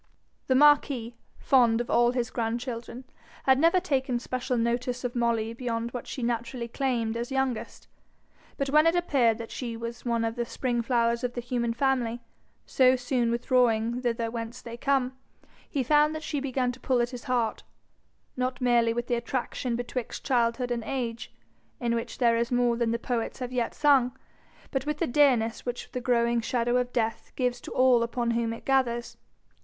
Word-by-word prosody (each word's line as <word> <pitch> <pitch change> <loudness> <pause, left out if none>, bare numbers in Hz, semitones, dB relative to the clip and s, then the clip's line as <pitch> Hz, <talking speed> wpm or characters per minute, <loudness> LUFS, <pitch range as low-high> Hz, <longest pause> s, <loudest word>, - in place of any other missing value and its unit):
The 260 - +3
marquis, 275 -4 +4 0.2
fond 240 -4 +4
of 240 - -3
all 240 0 +4
his 245 -1 -1
grandchildren, 235 +1 -4 0.4
had 265 0 +4
never 335 +4 +4
taken 265 -6 0
special 255 +1 -2
notice 245 +2 -1
of 245 0 -3
Molly 230 -2 0
beyond 235 -1 -3
what 245 - -6
she 255 - -5
naturally 235 +1 -2
claimed 235 -3 -1
as 235 +1 -3
youngest. 265 -3 -2 0.7
But 275 -1 -1
when 305 +2 +5
it 330 - +3
appeared 265 -10 +2
that 230 -1 -8
she 235 -3 -5
was 235 +1 -6
one 235 -2 0
of 225 - -1
the 240 - -1
spring 240 0 -2
flowers 235 0 +1
of 245 -1 -1
the - - -2
human 240 -1 -1
family, 240 -2 0 0.5
so 255 -1 +4
soon 245 -1 0
withdrawing 235 -1 +1
thither 230 -2 -1
whence 230 +1 -5
they 235 0 -7
come, 260 0 0 0.5
he 275 -4 -1
found 300 +4 +3
that 310 - -5
she 295 - -2
began 260 -2 -1
to 245 - -12
pull 255 -2 +1
at 240 +1 0
his 250 -1 -8
heart, 240 -4 0 0.7
not 255 0 -2
merely 240 -2 +3
with 240 0 -2
the 245 - -2
attraction 240 +1 -2
betwixt 245 0 -5
childhood 245 -1 +1
and 235 -1 -1
age, 235 -2 -4 0.5
in 235 -2 0
which 230 0 -3
there 235 -2 +3
is 235 +1 -1
more 245 -1 +2
than 235 -1 0
the 230 - 0
poets 235 -1 -3
have 250 -1 -5
yet 245 -2 -1
sung, 270 -4 +3 0.5
but 270 +1 -2
with 300 0 -1
the 335 - 0
dearness 245 -5 +2
which 245 0 -5
the 250 - -4
growing 235 -1 +2
shadow 240 +1 0
of 250 0 -1
death 225 -2 -2
gives 245 -1 -1
to - - -8
all 255 -2 +4
upon 235 0 -1
whom 230 -1 0
it 230 - -8
gathers. 240 -3 +1
245 Hz, 185 wpm, -27 LUFS, 235-255 Hz, 0.7 s, when